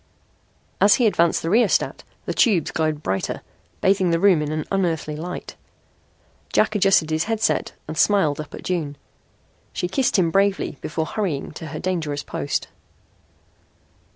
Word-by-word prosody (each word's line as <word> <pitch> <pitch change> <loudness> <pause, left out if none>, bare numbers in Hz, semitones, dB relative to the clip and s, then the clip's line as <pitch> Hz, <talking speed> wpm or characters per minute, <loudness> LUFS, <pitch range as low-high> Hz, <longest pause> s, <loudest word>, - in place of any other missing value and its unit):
As 205 - +7
he 245 - +2
advanced 170 -6 +2
the 165 - -1
rheostat 225 0 +2 0.2
the - - -2
tubes 205 -9 +2
glowed 155 -2 -1
brighter, 95 0 -2 0.4
bathing 190 -2 +3
the 165 0 +2
room 185 -4 +4
in 155 0 -2
unearthly 165 -6 -1
light. 175 +4 -6 1.0
Jack 215 - +2
adjusted 195 -6 +3
his 155 +1 +1
headset, 225 0 0
and 155 - -5
smiled 165 -4 +2
up 150 - -9
at - - -10
June. 155 -6 -2 0.8
She 180 - -2
kissed 240 +7 +1
him 170 -3 +2
bravely 195 -5 +1
before 160 +1 -2
hurrying 170 -7 -3
to 160 +1 -8
her 155 +1 -6
dangerous 155 -6 -2
post. 140 - -3
170 Hz, 145 wpm, -22 LUFS, 155-195 Hz, 1.0 s, As